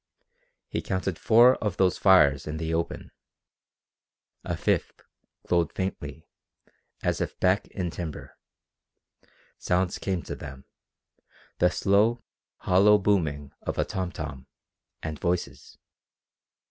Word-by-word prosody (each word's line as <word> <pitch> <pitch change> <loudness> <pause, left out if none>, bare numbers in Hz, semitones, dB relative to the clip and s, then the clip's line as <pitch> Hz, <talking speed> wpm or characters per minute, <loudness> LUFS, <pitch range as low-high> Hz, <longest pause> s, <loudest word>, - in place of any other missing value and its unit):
He - - -3
counted 95 -2 -3
four 120 +3 +6
of 105 -5 -3
those 95 -2 +2
fires 75 -8 +5
in 75 +1 -4
the 80 0 -3
open. 85 0 -3 1.3
A - - -3
fifth - - -1 0.5
glowed 85 -1 +2
faintly, 80 -5 -5 0.8
as - - 0
if - - -4
back 95 +2 +2
in 90 -3 -4
timber. 80 -4 -7 1.2
Sounds 90 0 0
came 95 -3 -2
to - - -6
them 70 -2 -10 0.9
the 90 - +5
slow, 105 +6 +2 0.4
hollow 100 +3 +5
booming 80 -9 0
of - - -4
a - - +1
tom 95 -2 -3
tom, 65 -1 -7 0.6
and 80 -2 -5
voices. 90 0 -3
90 Hz, 115 wpm, -26 LUFS, 80-95 Hz, 1.3 s, four